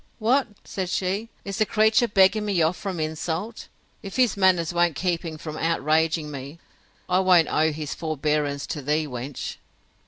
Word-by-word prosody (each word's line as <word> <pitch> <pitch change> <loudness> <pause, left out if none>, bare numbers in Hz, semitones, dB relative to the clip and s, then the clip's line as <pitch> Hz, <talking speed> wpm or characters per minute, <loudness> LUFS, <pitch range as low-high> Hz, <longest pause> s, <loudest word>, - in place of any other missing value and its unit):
—What! 255 +5 +2 0.2
said 185 -2 -4
she, 195 +5 -1 0.2
is 195 0 -4
the 215 - +4
creature 220 +2 +3
begging 200 +1 +4
me 200 -4 0
off 160 +3 +2
from 180 +1 -5
insult? 160 +7 -3 0.3
If 195 - -8
his 250 -5 +3
manners 185 -4 +3
won't 175 -2 +2
keep 175 +3 -1
him 160 -2 -6
from 155 0 -7
outraging 160 -1 +1
me, 140 +2 -8 0.5
I 185 0 +2
won't 180 -3 +4
owe 155 +1 +3
his 150 -1 -5
forebearance 150 -2 -1
to 150 - -3
thee, 150 +3 0
wench. 130 0 -6
170 Hz, 165 wpm, -24 LUFS, 155-195 Hz, 0.5 s, the